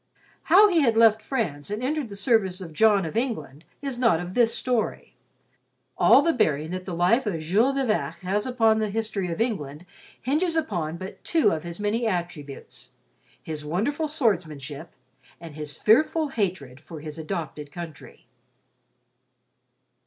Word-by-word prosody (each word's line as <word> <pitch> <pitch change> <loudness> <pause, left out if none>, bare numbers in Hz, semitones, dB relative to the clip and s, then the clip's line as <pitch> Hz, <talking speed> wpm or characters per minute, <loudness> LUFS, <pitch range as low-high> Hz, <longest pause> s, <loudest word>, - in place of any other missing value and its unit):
How 390 +6 +7
he 350 -5 +2
had 230 -5 +2
left 220 -1 +5
France 185 - -3
and 210 +4 -4
entered 285 -2 -1
the 200 - -8
service 200 -3 +1
of 170 -4 -9
John 205 0 +4
of 160 - -6
England 170 - -3 0.2
is 270 -3 -3
not 230 -10 +3
of 175 +1 -6
this 235 0 +3
story. 245 -3 -2 0.8
All - - +6
the 330 - +2
bearing 155 - 0
that 185 0 -5
the 180 - -4
life 220 +9 +2
of 175 -6 -1
Jules 210 - +2
de 275 -1 0
Vac 210 -7 -1
has 200 +5 -1
upon 225 -3 +3
the 215 -1 -1
history 210 -3 -2
of 165 - -4
England 165 - -2 0.3
hinges 320 +6 0
upon 175 - -2
but 185 +2 -9
two 325 -3 +3
of 160 - -2
his 170 +2 -7
many 220 +3 0
attributes—his 140 - -7
wonderful 230 - -1
swordsmanship 165 - -2 0.5
and 165 -3 -10
his 150 -1 -7
fearful 310 +7 +3
hatred 175 - -3
for 160 0 -10
his 155 +1 -7
adopted 155 -3 -5
country. 170 -4 -10
195 Hz, 155 wpm, -25 LUFS, 160-235 Hz, 0.8 s, How